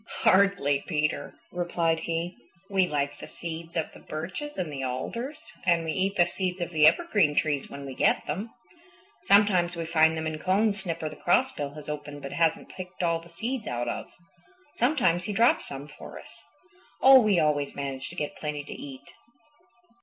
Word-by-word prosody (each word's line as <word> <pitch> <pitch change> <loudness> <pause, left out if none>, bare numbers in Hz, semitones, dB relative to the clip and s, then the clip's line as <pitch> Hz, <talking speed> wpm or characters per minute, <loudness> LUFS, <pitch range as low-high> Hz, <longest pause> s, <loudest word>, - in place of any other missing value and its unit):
"Hardly, 185 -8 +4
Peter," 155 -2 -1 0.2
replied 170 -2 0
he. 170 +2 -3 0.4
"We 190 -2 +3
like 145 -2 -2
the - - -8
seeds 165 0 -7
of 160 -2 -1
the - - -13
birches 185 - -6
and 175 -5 -3
the 135 - -4
alders, 230 - -5
and 170 -2 +2
we 160 - -1
eat 195 +4 0
the 175 - +5
seeds 185 0 -2
of 175 -1 -3
the 155 -2 +6
evergreen 175 - +3
trees 145 -3 0
when 140 0 -8
we 135 - -6
get - - +2
them. 195 +10 -3 0.8
Sometimes 190 -4 +4
we 165 -1 -3
find 160 0 +3
them 160 - -3
in 155 -1 -3
cones 200 +3 +1
Snipper 165 -4 -3
the 155 - -8
Crossbill 175 - +1
has 150 -1 -10
opened 145 -1 -6
but 140 - -6
hasn't 165 -1 +1
picked 180 -1 -7
all 170 -1 +2
the 170 - -15
seeds 225 +8 -4
out 120 0 -2
of. 120 - -3 0.7
Sometimes 235 - +2
he 210 - -3
drops 230 +4 +3
some 140 +1 -7
for 150 - -11
us. 230 - -15 0.6
Oh, 265 0 +10
we 210 -4 +3
always 145 -2 +1
manage 135 -1 -4
to - - -10
get 150 - -3
plenty 150 -1 -4
to - - -8
eat. 135 -1 -10
165 Hz, 185 wpm, -27 LUFS, 150-190 Hz, 0.8 s, Oh